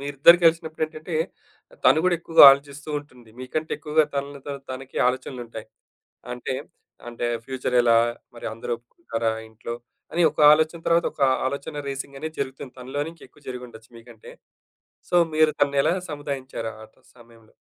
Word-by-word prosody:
మీరిద్దరూ 145 +4 +6
కలిసినప్పుడేంటంటే, 160 0 0 0.7
తను 155 - +6
గూడా 180 -1 +3
ఎక్కువగా 165 -2 +7
ఆలోచిస్తూ 140 +1 -2
ఉంటుంది. 125 -6 -19
మీకంటే 155 +5 -4
ఎక్కువగా 155 0 +2
తనలో 140 0 -4
తన 140 - -3
తనకి 130 +1 -6
ఆలోచనలు 130 0 -4
ఉంటాయి. 110 -1 -9 0.6
అంటే, 125 +1 -4 0.5
అంటే 120 0 -3 0.2
ఫ్యూచర్ 130 -1 -2
ఎలా? 115 -1 +5 0.4
మరి - - -7
అందరూ 115 +1 -5
ఒప్పుకుంటారా 115 -3 -3 0.2
ఇంట్లో 115 +1 -7 0.4
అని 175 +1 +2
ఒక 150 - -5
ఆలోచన, 160 +2 +2
తర్వాత 170 +1 +3
ఒక 140 - -5 0.2
ఆలోచన 140 +2 -4
రేసింగ్ 135 0 -6
అనేది 160 0 -6
జరుగుతుంది. 135 -1 -5
తనలోనే 145 +5 -4
ఇంకా 165 - -16
ఎక్కువ 150 - -24
జరిగుండొచ్చు 125 -3 -9
మీకంటే. 115 -1 -14 0.8
సో, - - -2 0.2
మీరు 155 0 +4
తనని 140 -1 +3
ఎలా 160 - +3 0.2
సముదాయించారు 135 -5 -5
ఆ - - -13 0.3
సమయంలో? 115 -2 -19
140 Hz, 145 wpm, -24 LUFS, 125-155 Hz, 0.8 s, ఎక్కువగా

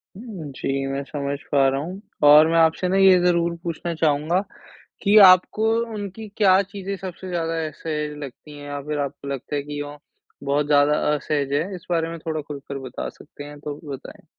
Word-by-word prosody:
उम, 195 - -8
जी। 135 0 -2
मैं 135 +1 -3
समझ 140 0 -4
पा 140 -2 +4
रहा 135 +1 -1
हूँ। 185 +5 -7 0.2
और 150 +2 +8
मैं 165 +1 +2
आपसे 165 +2 +3
ना 190 - +1
ये 190 -1 +7
ज़रूर 170 -1 +2
पूछना 170 0 -3
चाहूँगा 155 +2 +1 0.6
कि 205 +1 +5
आपको 185 +4 +3 0.3
उनकी 205 +1 -6
क्या 195 -2 +5
चीज़ें 200 0 -6
सबसे 185 0 -8
ज़्यादा 165 -2 -2
असहज 150 -1 -4
लगती 145 +2 -11
हैं? 145 - -10
या 145 0 -5
फ़िर 150 +1 -4
आपको 140 0 -4
लगता 140 +1 -4
है 145 - 0
कि 145 0 -5
वो 145 0 -7 0.5
बहुत 145 +1 +1
ज़्यादा 145 0 +4 0.2
असहज 140 -1 -2
हैं? 165 +7 0
इस 180 0 -11
बारे 165 -1 +1
में 165 - -6
थोड़ा 155 -1 -3
खुल 145 -1 -8
कर 140 - -4
बता 125 - -5
सकते 145 -1 -13
हैं 145 0 -10
तो 150 0 -5
भी 155 - -15
बताएँ। 135 -2 -9
155 Hz, 200 wpm, -23 LUFS, 145-180 Hz, 0.6 s, और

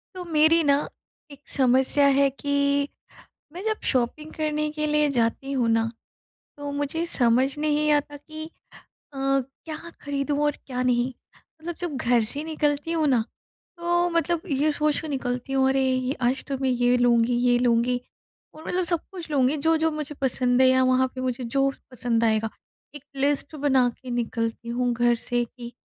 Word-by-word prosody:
तो 365 - -5
मेरी 320 0 +4
ना, 280 -1 +4 0.5
एक 280 - -12
समस्या 265 +2 +3
है 280 0 +4
कि, 280 +1 0 0.7
मैं 355 +3 -7
जब 435 -1 -1
शॉपिंग 270 +5 -1
करने 305 -1 -1
के 305 0 -2
लिए 300 0 +2
जाती 250 +2 -1
हूँ 250 -4 +1
ना, 225 0 +2 0.7
तो 290 0 -5
मुझे 290 +3 -2
समझ 255 -4 +3
नहीं 300 0 +1
आता 290 0 0
कि 310 +2 -9 0.6
अ, - - -10
क्या 275 +3 -2 0.2
खरीदूँ 285 0 -2
और 295 -1 +1
क्या 250 -2 -3
नहीं? 250 0 +1 0.5
मतलब 345 +1 -4
जब 345 -6 -3
घर 245 -1 +2
से 285 +5 -3
निकलती 300 0 -1
हूँ 320 -2 +1
ना, 255 -5 +3 0.5
तो 345 +1 +1
मतलब 335 0 0
ये 290 +2 +2
सोच 300 0 0
के 315 - -7
निकलती 260 -2 -3
हूँ, 265 0 +3
अरे 270 0 +2
ये 255 0 0
आज 255 +2 +1
तो 275 -2 -2
मैं 265 - +2
ये 245 0 +2
लूँगी, 240 -1 +3
ये 245 0 +3
लूँगी 245 0 +2 0.5
और 315 +1 -12
मतलब 365 0 0
सब 340 -1 0
कुछ 345 -4 -8
लूँगी, 275 0 +2
जो-जो 320 +2 +2
मुझे 300 -1 -5
पसंद 250 -1 +2
है 260 - +6
या 260 0 +4
वहाँ 255 0 +3
पे 260 - -5
मुझे 255 -1 -2
जो 275 +3 +1 0.2
पसंद 235 -2 0
आएगा। 220 0 +1 0.4
एक 290 -2 -10
लिस्ट 285 +2 0
बना 270 -3 +3
के 255 - -8
निकलती 235 -1 -3
हूँ 245 +1 0
घर 240 0 +3
से 240 +1 0
कि 240 0 -11
275 Hz, 175 wpm, -25 LUFS, 245-300 Hz, 0.7 s, है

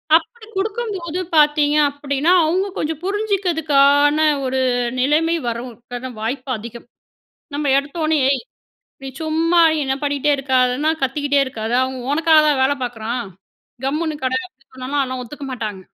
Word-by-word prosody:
அப்படி 435 +8 -1
குடுக்கும்போது 390 -5 -3 0.2
பார்த்தீங்க 295 -1 +4
அப்படீன்னா, 285 +3 -1
அவங்க 370 +5 +1
கொஞ்சம் 310 0 -2
புரிஞ்சிக்கிறதுக்கான 315 -8 +2 0.3
ஒரு 260 0 -1 0.4
நிலைமை 310 +5 +2
வரும். 235 +2 -4 0.2
அதுக்கான 245 +1 -6
வாய்ப்பு 255 +4 -4
அதிகம். 235 +2 -10 0.7
நம்ம 290 -1 0
எடுத்தோனே, 310 +2 -1
ஏய்! 280 - 0 0.6
நீ 270 - -6
சும்மா 325 +2 +2 0.2
என்ன 265 -1 0
பண்ணிட்டே 285 0 0
இருக்காதன்னா 260 +2 +1
"கத்திக்கிட்டே 285 +2 +1
இருக்காத, 225 -3 -5
அவன் 260 0 -3
உனக்காக 320 0 +5
தான் 280 -3 +2
வேலை 280 +2 +3
பார்க்குறான், 240 0 -3 0.6
கம்முன்னு 305 +3 -1
கெட." 255 - 0
அப்படி 270 -5 -34
சொன்னால்லாம், 260 +3 -3
அதெல்லாம் 255 -1 -4
ஒத்துக்க 285 +4 -9
மாட்டாங்க. 215 -6 -5
285 Hz, 130 wpm, -20 LUFS, 260-320 Hz, 0.7 s, உனக்காக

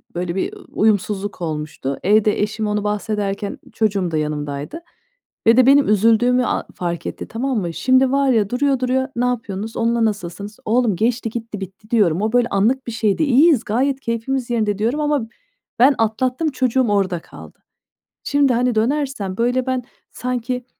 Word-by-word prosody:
böyle, 175 0 -3
bir, 190 - -2
ııı, - - -13
uyumsuzluk 205 -2 0
olmuştu. 150 -4 -4
Evde 210 +2 +3
eşim 215 +1 -1
onu 210 0 -1
bahsederken 210 -1 -2
ı - - -17
çocuğum 195 -5 0
da 155 - 0
yanımdaydı 150 - -4 0.7
ve 230 +2 +6
de 255 - +6
benim 275 0 +5
üzüldüğümü 230 +4 +3
a - - -1
fark 170 -1 -4
etti. - - -6
Tamam 245 +1 -1
mı? 170 -3 -3
Şimdi, 260 +3 +3
var 275 0 +2
ya, 215 -5 +2
duruyor 270 +1 +1
duruyor, 260 +1 0
"Ne 240 +1 0
yapıyorsunuz, 225 -3 -3
onunla 230 0 +1
nasılsınız?" 205 +1 -4
"Oğlum, 225 -3 +2
geçti 230 +3 0
gitti, 225 -3 -6
bitti." 195 +3 -10
diyorum. 195 -6 +3
"O 220 +2 -1
böyle 245 -1 +3
anlık 235 +7 +1
bir - - -3
şeydi. 220 +4 +1
İyiyiz, 280 -1 +4
gayet 265 +5 0
keyfimiz 240 +2 -2
yerinde." 215 -4 0
diyorum 235 +8 0
ama 295 -6 0 0.5
ben 270 +3 +6
atlattım, 255 +7 0
çocuğum 255 -2 +1
orada 190 -4 +1
kaldı. - - -14 0.7
Şimdi, 285 -2 +2
hani, 245 0 +1
dönersem, 230 -5 -1
böyle, 245 +2 +1
ben 255 -1 -1 0.3
sanki 250 0 -3
225 Hz, 165 wpm, -20 LUFS, 205-255 Hz, 0.7 s, ve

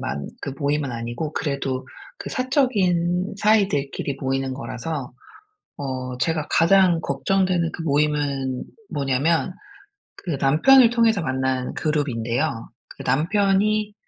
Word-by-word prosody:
만 70 0 -4
그 140 - -4
모임은 145 -2 0
아니고 120 +6 -4
그래도 135 -3 -2 0.3
그 - - -6
사적인 195 - +1
사이들끼리 195 -11 +1
모이는 135 -1 -1
거라서 135 +1 -5 0.7
어 130 -2 -4
제가 155 +4 0
가장 175 0 +4
걱정되는 180 +3 0
그 165 - -6
모임은 145 -3 0 0.3
뭐냐하면 145 +5 +1 0.6
그 165 -7 -4
남편을 230 - +6
통해서 230 -5 +3
만난 130 -2 -1
그룹인데요. 130 -4 -1 0.2
그 - - -10
남편이 200 +8 +1
150 Hz, 260 characters per minute, -23 LUFS, 130-185 Hz, 0.7 s, 남편을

